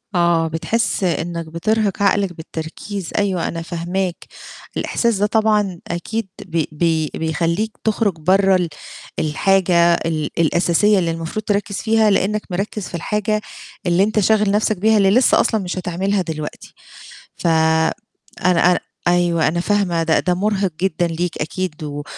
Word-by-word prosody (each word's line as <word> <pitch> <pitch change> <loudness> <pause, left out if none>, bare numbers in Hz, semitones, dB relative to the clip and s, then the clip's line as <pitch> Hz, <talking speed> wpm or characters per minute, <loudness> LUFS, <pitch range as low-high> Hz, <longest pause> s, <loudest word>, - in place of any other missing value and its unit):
آه. 170 -2 +3
بتحس 195 +7 -1
إنك 170 -1 -1
بترهق 205 +4 0
عقلك 200 -2 +2
بالتركيز 165 +4 -6
أيوه 195 -5 0
أنا 165 - -4
فاهماك، 175 +2 -3 0.5
الإحساس 235 -3 0
ده 205 - +2
طبعًا 210 -4 +1
أكيد 200 +5 -3 0.2
بي 165 -4 -1
بي 160 -1 0
بيخلّيك 165 +6 -1
تخرج 220 -2 +1
برّه 190 +4 +4
ال 180 -2 0 0.5
الحاجة 170 +1 +3
ال 160 -3 -1
الأساسية 175 +5 +3
اللي 170 -2 0
المفروض 165 +6 -4
تركّز 205 0 -1
فيها 220 +1 +2
لأنك 205 +1 +1
مركّز 195 +2 -3
في - - -7
الحاجة 210 +5 -1 0.4
اللي 175 +1 +3
أنت 215 +1 +1
شاغل 210 0 +3
نفْسك 210 0 +1
بيها 220 +4 +3
اللي 195 -2 +4
لسّه 250 +4 +4
أصلًا 220 -2 +1
مش 180 +1 -4
هتعملها 185 +2 -1
دلوقتي، 155 -3 -6 0.6
ف - - -3
أنا 160 +2 +1
أنا 180 - +2 0.3
أيوه، 175 -2 +2
أنا 170 +3 0
فاهمة 180 -3 +1
ده 160 0 +2
ده 180 - +1
مرهق 195 0 0
جدًا 175 -2 +1
ليك 170 +1 -3
أكيد 160 0 -4
و 145 -1 -5
180 Hz, 145 wpm, -19 LUFS, 165-205 Hz, 0.6 s, برّه